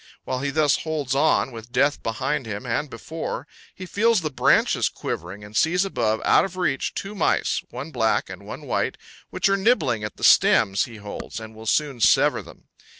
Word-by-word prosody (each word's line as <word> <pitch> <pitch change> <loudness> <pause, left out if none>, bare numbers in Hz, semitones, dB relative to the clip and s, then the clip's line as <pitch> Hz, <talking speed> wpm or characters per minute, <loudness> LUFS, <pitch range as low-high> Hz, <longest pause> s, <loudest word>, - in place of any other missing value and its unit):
While 130 - -3
he 140 - -1
thus 145 0 +2
holds 150 -5 -3
on, 140 -1 +2
with 115 0 -10
death 140 +3 +2
behind 130 +4 -2
him 105 +3 -5
and 130 +5 -1
before, 130 +1 -6 0.3
he 185 - -8
feels 220 +2 +2
the 155 -2 -3
branches - - +3
quivering, 95 +5 -6
and 105 +1 -12
sees 175 - +2
above, 110 - -1
out - - +5
of 185 -1 -5
reach, 155 -7 -1
two 200 +1 -5
mice, 195 - +1
one 135 +6 -7
black 115 -5 +1
and - - -9
one - - -8
white, - - -1 0.3
which 190 +2 0
are 195 - +3
nibbling 190 - +2
at 105 - -6
the - - -10
stems 95 0 +5
he 120 - -11
holds 105 +1 -7
and 110 0 -10
will 110 0 -11
soon 140 +1 +1
sever - - +4
them. - - -15
135 Hz, 195 wpm, -23 LUFS, 110-160 Hz, 0.3 s, out